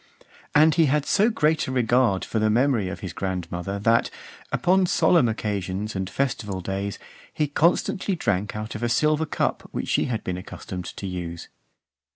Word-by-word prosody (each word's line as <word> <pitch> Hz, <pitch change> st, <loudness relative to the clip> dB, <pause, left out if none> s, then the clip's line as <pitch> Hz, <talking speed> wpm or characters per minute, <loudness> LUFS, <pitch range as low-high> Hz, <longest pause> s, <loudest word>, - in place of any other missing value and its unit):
And 155 Hz, +1 st, +6 dB
he 160 Hz, -1 st, +4 dB
had 145 Hz, +1 st, +1 dB
so 210 Hz, +3 st, +3 dB
great 160 Hz, -8 st, +1 dB
a -, -, -3 dB
regard 120 Hz, -5 st, +2 dB
for 110 Hz, -, -2 dB
the 110 Hz, 0 st, +2 dB
memory 115 Hz, -3 st, +2 dB
of 95 Hz, -, -7 dB
his 95 Hz, -3 st, -5 dB
grandmother, 90 Hz, 0 st, -3 dB
that, 115 Hz, +3 st, +2 dB, 0.4 s
upon 185 Hz, +1 st, +3 dB
solemn 165 Hz, -8 st, +4 dB
occasions 105 Hz, -1 st, -3 dB
and 95 Hz, -1 st, -2 dB
festival 110 Hz, -8 st, -2 dB
days, 100 Hz, +2 st, -3 dB, 0.3 s
he 150 Hz, -, 0 dB
constantly 175 Hz, +5 st, +1 dB
drank 105 Hz, -, -1 dB
out 105 Hz, 0 st, -5 dB
of 110 Hz, -, -6 dB
a 120 Hz, -, 0 dB
silver 155 Hz, +5 st, +2 dB
cup -, -, -2 dB
which -, -, -4 dB
she -, -, +2 dB
had 115 Hz, -3 st, -3 dB
been 90 Hz, -1 st, -3 dB
accustomed 90 Hz, 0 st, -7 dB
to 100 Hz, -, -7 dB
use. 85 Hz, -3 st, -5 dB
110 Hz, 175 wpm, -24 LUFS, 95-150 Hz, 0.4 s, And